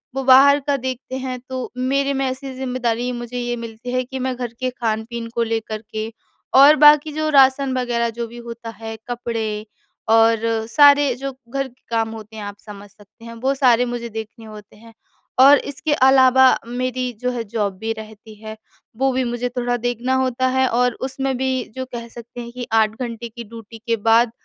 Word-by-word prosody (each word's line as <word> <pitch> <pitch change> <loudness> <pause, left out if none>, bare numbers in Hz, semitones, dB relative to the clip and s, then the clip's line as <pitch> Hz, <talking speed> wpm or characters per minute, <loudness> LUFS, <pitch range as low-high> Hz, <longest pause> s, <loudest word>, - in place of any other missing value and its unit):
वो 270 - -2
बाहर 275 +2 +7
का 285 - +2
देखते 260 0 -5
हैं। 255 -1 -5
तो 255 -1 -5
मेरे 275 +2 0
में 270 0 -1
ऐसी 260 +1 -4
ज़िम्मेदारी 250 -2 -2
मुझे 240 0 -6
ये 240 0 -2
मिलती 230 +1 -7
है 255 0 +1
कि 265 +1 -7
मैं 260 0 -2
घर 245 -2 -5
के 255 - -1
खान-पीन 230 -1 -3
को 235 - +2
लेकर 225 -1 -3
के 220 0 -4 0.5
और 290 +2 +9
बाकी 300 +1 +6
जो 310 +1 -1
राशन 270 -1 +4
वग़ैरह 235 -2 0
जो 235 - -2
भी 240 +1 -12
होता 230 0 -7
हैं। 225 0 -7
कपड़े 225 -3 -3 0.4
और 225 0 +5 0.3
सारे 285 +1 +5
जो 275 +2 -5 0.2
घर 275 +1 -2
के 255 0 -24
काम 225 -1 0
होते 220 0 -10
हैं 215 - -7
आप 205 0 -7
समझ 205 -1 -12
सकते 205 +3 -19
हैं। 230 - -8
वो 270 - +2
सारे 250 -3 +4
मुझे 240 -1 -5
देखने 220 +1 -8
होते 210 -2 -12
हैं। 225 +1 -16 0.5
और 275 +2 +8
इसके 285 +2 -3
अलावा 260 -1 +5 0.2
मेरी 255 +1 -2
जो 250 0 0
है 240 -2 -3
जॉब 205 -3 -3
भी 220 +2 -3
रहती 220 0 -11
है। 220 0 -7 0.4
वो 270 +1 +2
भी 260 +1 0
मुझे 240 0 -2
थोड़ा 245 0 -2
देखना 245 +2 -2
होता 260 0 0
है। 260 0 +3
और 250 0 +1 0.2
उसमें 270 0 -2
भी 260 -1 -1
जो 260 0 -4
कह 235 0 -6
सकते 235 +1 -10
हैं 235 0 -8
कि 245 0 -6 0.4
8 235 -1 -6
की 235 +1 -9
ड्यूटी 225 0 -12
के 230 - +2
बाद 230 +1 +5
245 Hz, 195 wpm, -20 LUFS, 225-260 Hz, 0.5 s, और